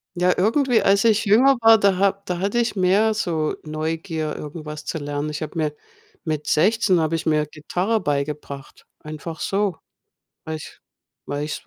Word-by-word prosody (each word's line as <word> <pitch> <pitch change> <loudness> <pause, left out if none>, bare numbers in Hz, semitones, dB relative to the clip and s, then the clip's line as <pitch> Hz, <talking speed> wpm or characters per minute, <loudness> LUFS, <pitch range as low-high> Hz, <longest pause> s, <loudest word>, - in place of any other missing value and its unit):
Ja, 180 +1 +3
irgendwie, 240 +5 +2
als 195 0 +3
ich 225 -1 +3
jünger 255 +7 +5
war, 225 0 +7
da 200 -3 +2
ha 195 0 +2
da 180 -1 -3
hatte 200 +5 -1
ich 235 -2 +1
mehr 200 +4 +3
so 160 -7 -1
Neugier, 155 0 -3
irgendwas 150 0 -7
zu - - -3
lernen. 145 0 -3
Ich 150 - -5
habe 155 - -7
mir 150 -2 -1 0.5
mit 155 -2 -3
16 190 +2 +3
habe 160 0 0
ich 160 - -4
mir 150 -1 +2
Gitarre 180 +9 -2
beigebracht, 140 -1 -4
einfach 155 +1 -8
so, 195 -3 -1 0.7
weil 160 0 -4
ich 155 - -11 0.5
weil 145 +1 -3
ich 150 - -4
es - - -23
165 Hz, 175 wpm, -22 LUFS, 150-200 Hz, 0.7 s, war